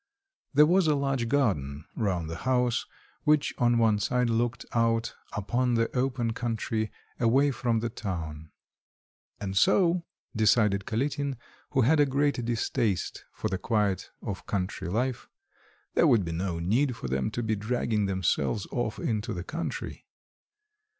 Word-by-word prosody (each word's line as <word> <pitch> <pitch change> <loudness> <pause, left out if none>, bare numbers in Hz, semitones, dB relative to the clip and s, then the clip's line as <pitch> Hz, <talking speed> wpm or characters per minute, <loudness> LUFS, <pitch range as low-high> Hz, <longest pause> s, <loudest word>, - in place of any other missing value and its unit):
There 150 +1 +8
was 180 +2 +3
a 150 - +4
large 135 -4 0
garden 75 - 0
round 90 -7 -1
the 80 +1 -5
house, 125 +1 +1 0.4
which 150 -1 +3
on 120 -1 +4
one 110 -2 +3
side 125 +3 +1
looked 120 +1 0
out 115 0 +1 0.2
upon 120 +4 0
the 115 +2 0
open 125 -3 0
country 110 -2 -2 0.3
away 135 +5 +4
from 120 -4 0
the 120 - -1
town. 80 -8 -5 0.9
"And 95 -1 -4
so," 180 - +4 0.3
decided 105 -3 +3
Kalitin, 140 +3 -1 0.3
who 130 - +2
had 150 +6 +4
a 145 - +5
great 140 -1 +1
distaste 115 -5 -1
for - - -3
the 95 - -2
quiet 105 -4 0
of 100 -2 -5
country 95 -1 -2
life, 120 +5 -1 0.6
"there - - +4
would 110 -6 +4
be 85 - -3
no 85 +1 -2
need 115 +10 +1
for 65 - -6
them 65 +10 0
to 120 +2 -3
be 110 -1 0
dragging 105 -1 0
themselves 95 +2 0
off 110 -3 -2
into 110 -2 -2
the 85 - -4
country." 165 - -5
115 Hz, 150 wpm, -28 LUFS, 100-130 Hz, 0.9 s, There